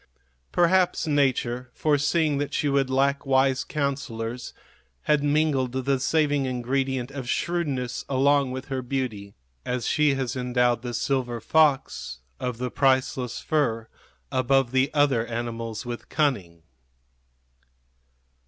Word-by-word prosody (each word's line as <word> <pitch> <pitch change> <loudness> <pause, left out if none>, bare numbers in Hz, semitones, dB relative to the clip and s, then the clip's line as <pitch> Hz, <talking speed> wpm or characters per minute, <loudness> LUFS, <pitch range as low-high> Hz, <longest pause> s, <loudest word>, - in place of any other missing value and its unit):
Perhaps 175 0 +3
nature, 130 -4 0
foreseeing 150 0 +1
that 145 - -3
she 150 - 0
would 140 -2 +1
lack 140 +1 +1
wise 135 -1 +2
counsellors, 130 -5 -3 0.5
had 150 -1 +2
mingled 145 -4 +1
the 130 +1 0
saving 145 -1 +1
ingredient 130 +1 -1
of 135 -3 -6
shrewdness 140 -9 -1
along 140 0 +3
with 130 +1 -5
her 135 -1 -2
beauty, 120 -6 -4 0.3
as 125 -1 -2
she 150 -2 +3
has 130 -1 -2
endowed 125 -2 +1
the 120 -1 -5
silver 125 -4 -1
fox 140 - +1 0.2
of 125 -2 -3
the 125 0 -3
priceless 130 -2 +1
fur 115 -8 0 0.4
above 130 -1 +2
the 130 +2 +2
other 145 -6 +2
animals 115 -1 -4
with 120 -1 -6
cunning. 100 - -1
130 Hz, 120 wpm, -25 LUFS, 125-145 Hz, 0.5 s, Perhaps